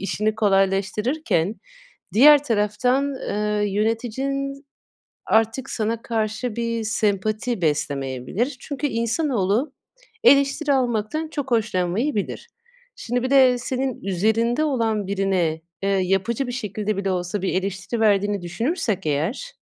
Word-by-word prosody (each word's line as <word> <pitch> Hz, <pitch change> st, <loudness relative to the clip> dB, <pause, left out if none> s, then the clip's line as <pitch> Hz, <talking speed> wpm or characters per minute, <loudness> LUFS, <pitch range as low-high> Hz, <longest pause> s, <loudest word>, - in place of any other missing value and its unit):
işini 210 Hz, +2 st, -1 dB
kolaylaştırırken 195 Hz, -, +1 dB, 0.6 s
diğer 290 Hz, +5 st, +7 dB
taraftan, 250 Hz, +5 st, +1 dB
eee, 210 Hz, 0 st, 0 dB
yöneticin 270 Hz, +6 st, -2 dB, 0.6 s
artık 225 Hz, +3 st, +1 dB
sana 225 Hz, +1 st, -2 dB
karşı 220 Hz, +1 st, -2 dB
bir 230 Hz, -1 st, -2 dB
sempati 215 Hz, +1 st, -1 dB
beslemeyebilir. 145 Hz, -, -1 dB
Çünkü 290 Hz, 0 st, -3 dB
insanoğlu, 235 Hz, -, 0 dB, 0.5 s
eleştiri 280 Hz, -1 st, +4 dB
almaktan 255 Hz, +4 st, 0 dB
çok 285 Hz, -4 st, -5 dB
hoşlanmayabilir. 220 Hz, -, -1 dB, 0.5 s
Şimdi 245 Hz, +1 st, -2 dB
bir 255 Hz, -, -2 dB
de 260 Hz, -3 st, +5 dB
senin 260 Hz, 0 st, -3 dB
üzerinde 220 Hz, -, +1 dB
olan 225 Hz, -8 st, 0 dB
birine, 190 Hz, -5 st, 0 dB, 0.2 s
eee, 195 Hz, -, 0 dB
yapıcı 195 Hz, +6 st, 0 dB
bir 245 Hz, -, -4 dB
şekilde 210 Hz, -3 st, -3 dB
bile 195 Hz, -1 st, -1 dB
olsa 180 Hz, +2 st, -2 dB
bir 190 Hz, -, -1 dB
eleştiri 195 Hz, +4 st, -2 dB
verdiğini 205 Hz, -2 st, +2 dB
düşünürsek 215 Hz, -, -2 dB
eğer 180 Hz, -, -2 dB
220 Hz, 110 wpm, -23 LUFS, 195-255 Hz, 0.6 s, diğer